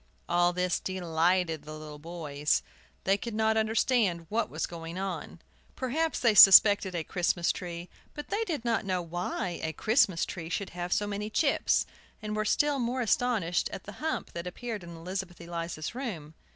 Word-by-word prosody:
All 175 0 +3
this 180 0 0
delighted 175 -2 0
the 155 0 -9
little 150 -1 -9
boys. 150 -3 -1 0.4
They 195 +1 +3
could 230 -1 -5
not 220 0 +2
understand 220 -5 +1
what 230 +2 0
was 155 - -2
going 165 0 -7
on. 185 -4 -5 0.4
Perhaps 310 +6 -1
they 235 -3 +4
suspected 195 -1 +8
a 165 - -1
Christmas 175 0 0
tree, 175 -1 -6 0.3
but 295 - -7
they 420 +3 0
did 305 - -3
not 230 -3 +1
know 185 -2 -1
why 175 +1 -3
a 160 - -2
Christmas 210 - +2
tree 165 -3 -7
should 195 +3 -3
have 175 0 -5
so 205 - +2
many 205 +1 -4
chips, 280 +6 +2 0.3
and 210 0 -4
were 215 0 -1
still 290 +5 +2
more 250 +1 -1
astonished 220 -7 +1
at 190 - -7
the 205 - -8
hump 315 0 -2
that 170 +1 -5
appeared 220 +1 -5
in 170 -1 -9
Elizabeth 180 +1 -5
Eliza's 170 -1 -5
room. 195 - -6
185 Hz, 175 wpm, -29 LUFS, 170-220 Hz, 0.4 s, suspected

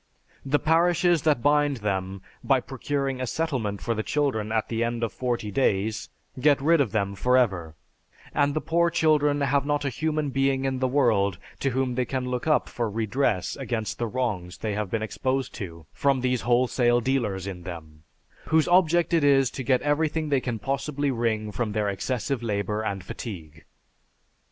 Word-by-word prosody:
The 140 +2 +2
parishes 170 +2 +3
that 140 -6 +1
bind 145 -1 +3
them, 95 -1 -2 0.2
by 135 -2 +3
procuring 135 +1 -3
a 130 - -2
settlement 120 - -2
for 115 - 0
the 110 - -2
children 120 -5 -1
at 110 -1 0
the 115 0 -1
end 120 0 -2
of 115 - -2
forty 120 -4 -2
days, 105 -2 0 0.3
get 145 +2 +4
rid 160 +2 +4
of 120 -8 0
them 100 -2 0
for 125 +6 +2
ever; 90 -10 0 0.6
and 145 0 +2
the 155 - 0
poor 170 +2 +2
children 150 -3 +2
have 140 0 +2
not 145 0 -1
a - - +1
human 155 +2 -1
being 135 0 +1
in 130 -1 -1
the 130 - +1
world 110 -9 +2 0.2
to 135 - +1
whom 130 0 -1
they 125 0 0
can 130 -1 -3
look 125 +3 -3
up 155 - +3
for 120 -2 -2
redress 110 -1 0
against 115 -6 -3
the 120 - -1
wrongs 105 -8 -3
they 105 -2 -3
may 105 0 -1
be 100 +4 -2
exposed 130 +5 -2
to 85 -5 -8
from 135 -2 +1
these 125 -2 0
wholesale 120 0 +2
dealers 115 -7 -1
in 95 -3 -6
them, 80 -4 -9 0.4
whose 160 0 +3
object 175 -1 +3
it 165 -3 +3
is 135 -2 +4
to - - -5
get 130 0 +1
everything 155 +1 0
they 140 -2 +2
can 120 -3 -3
possibly 140 +3 -2
wring 110 -3 -1
from 105 +2 -2
their 105 -1 0
excessive 120 +5 -2
labor 105 -1 -1
and 100 -4 -3
fatigue." 80 -7 -8
125 Hz, 185 wpm, -26 LUFS, 105-140 Hz, 0.6 s, get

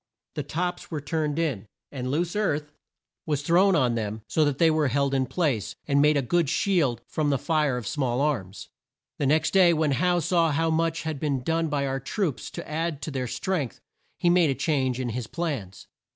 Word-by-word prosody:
The - - -3
tops 175 +5 -3
were 155 - -3
turned 150 +1 -2
in, 140 -12 -1 0.2
and 130 -2 -4
loose 170 +6 -1
earth 150 -8 -1 0.6
thrown 175 +7 +3
on 125 -6 +2
them 110 -1 -3
so 155 - +2
that 145 -2 0
they 165 0 +4
were 155 -2 +2
held 140 +2 +1
in 130 -1 +1
place, 130 - -1
and 140 -1 +3
made 150 0 +4
a 140 - +1
good 165 +4 +1
shield 145 - +1
from 150 -2 -1
the 140 - +2
fire 150 -3 +1
of 120 - -5
small 130 -1 -1
arms. 115 -10 -2 0.5
The 140 - +1
next 155 +3 +2
day, 185 -3 +6
when 155 -2 +1
Howe 175 +6 +2
saw 170 -1 +2
how 160 +3 +1
much 165 -1 0
had 155 -3 -3
been 140 -4 -1
done 165 +3 0
by 145 -2 -1
our 135 0 -2
troops 145 - -2
to - - -8
add 155 -1 -3
to 155 - -4
their 130 -2 -2
strength, 150 - -2 0.4
he - - 0
made 175 -2 +4
a 135 - 0
change 130 -2 0
in 125 -2 -2
his 120 0 -4
plans. 130 - -4
150 Hz, 205 wpm, -26 LUFS, 130-165 Hz, 0.6 s, day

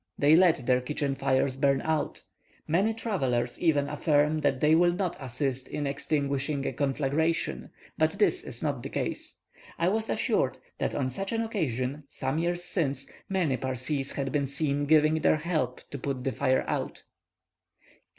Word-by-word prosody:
They 145 +2 +6
let 170 -7 +4
their 125 0 +3
kitchen 140 +1 -2
fires 135 -1 +1
burn 135 0 +2
out. 160 -1 -1 0.4
Many 190 +8 +2
travellers 135 - -1
even 145 -4 +3
affirm 150 +1 +2
that 140 -3 +1
they 150 +3 +4
will 175 +1 +5
not 180 -1 -1
assist 130 0 -3
in 145 - -3
extinguishing 140 0 -1
a - - -1
conflagration; 145 +4 0 0.3
but - - +3
this 375 -2 +1
is - - -7
not - - -1
the - - -6
case. - - -4 0.4
I 170 +2 +2
was 220 +2 0
assured - - +1 0.2
that - - -1
on 130 -3 0
such 195 +10 -4
an 230 0 +1
occasion, 145 - -2
some 135 +4 -2
years 175 +1 -1
since, 140 -7 -2 0.2
many 175 -9 +1
Parsees 130 +2 -2
had 135 -1 -2
been 140 0 0
seen 145 +1 -1
giving 155 +1 +4
their - - +4
help 155 -6 -2
to 140 - -5
put 135 -1 -3
the 135 - 0
fire 130 -1 +1
out. - - -3
145 Hz, 165 wpm, -28 LUFS, 135-165 Hz, 0.4 s, They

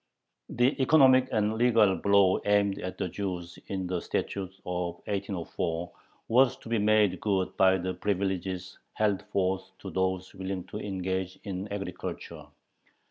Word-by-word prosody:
The 125 +4 +1
economic 130 -2 +6
and 110 +1 +1
legal 115 -5 +4
blow 100 -2 +4
aimed 100 -1 +2
at 90 - -5
the 95 - -1
Jews 90 -2 -5
in 95 -2 -3
the 90 -1 -2
Statute 95 -2 -3
of 90 -1 -2
1804 90 -4 -3 0.4
was 125 +2 +4
to - - -12
be 115 -1 +1
made 105 -3 +3
good 95 -3 0
by 95 0 +5
the 95 0 -3
privileges 95 -2 -2
held 105 -3 +1
forth 95 -2 -1
to 95 - -8
those 95 0 -1
willing 95 -1 -4
to - - -5
engage 95 -1 -3
in 95 0 -4
agriculture. 100 -3 -6
95 Hz, 140 wpm, -28 LUFS, 95-105 Hz, 0.4 s, economic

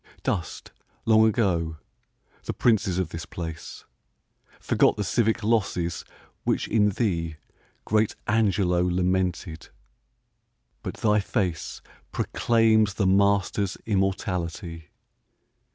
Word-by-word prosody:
Dust, 85 -3 -3 0.3
long 110 0 +5
ago, 85 -8 0 0.7
the - - -3
princes 100 -6 +2
of 95 - -1
this 85 0 -7
place; 80 -2 -7 0.7
Forgot - - +2
the 105 - -1
civic 110 +3 +1
losses 95 -7 0 0.4
which - - 0
in 105 -1 +3
thee 85 -7 -1 0.5
Great 110 0 +1
Angelo 100 -5 +2
lamented; 90 -2 -1 1.1
but - - -5
thy 105 -1 +2
face 95 -5 -2 0.3
Proclaims 110 -3 +2
the 100 - 0
master's 100 0 +2
immortality! 90 -4 -2
95 Hz, 95 wpm, -25 LUFS, 85-110 Hz, 1.1 s, long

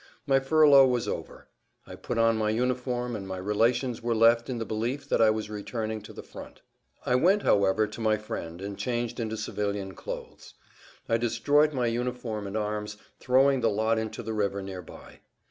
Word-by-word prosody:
My 135 -2 +3
furlough 140 -1 +6
was 125 -2 0
over. - - -6 0.4
I - - -10
put - - -5
on 115 0 +4
my 110 -1 0
uniform, 125 +1 -1
and 100 -2 -6
my 95 -1 -5
relations 115 +6 0
were 115 0 0
left 115 +2 +4
in 125 - -2
the 115 - -3
belief 115 +7 -3
that - - +2
I 110 - +6
was 110 0 -1
returning 110 +1 -4
to 105 - -11
the - - -10
front. - - -12 0.4
I - - +1
went, 185 +11 +3
however, 100 +1 +3
to 105 +2 -8
my 110 -1 +2
friend 85 -5 -7
and 100 0 -6
changed 120 -1 -2
into 110 -1 -3
civilian 100 -2 -3
clothes. - - -9 0.5
I 115 - +2
destroyed 145 +6 +2
my 130 -4 -1
uniform 120 -3 -3
and 100 +2 -4
arms, 105 0 -3 0.2
throwing 135 +1 +3
the 115 - +3
lot 110 +2 +1
into 110 -1 -5
the 110 - -4
river 100 -2 -1
near 95 -1 -6
by. 85 - -14
115 Hz, 190 wpm, -27 LUFS, 105-125 Hz, 0.5 s, furlough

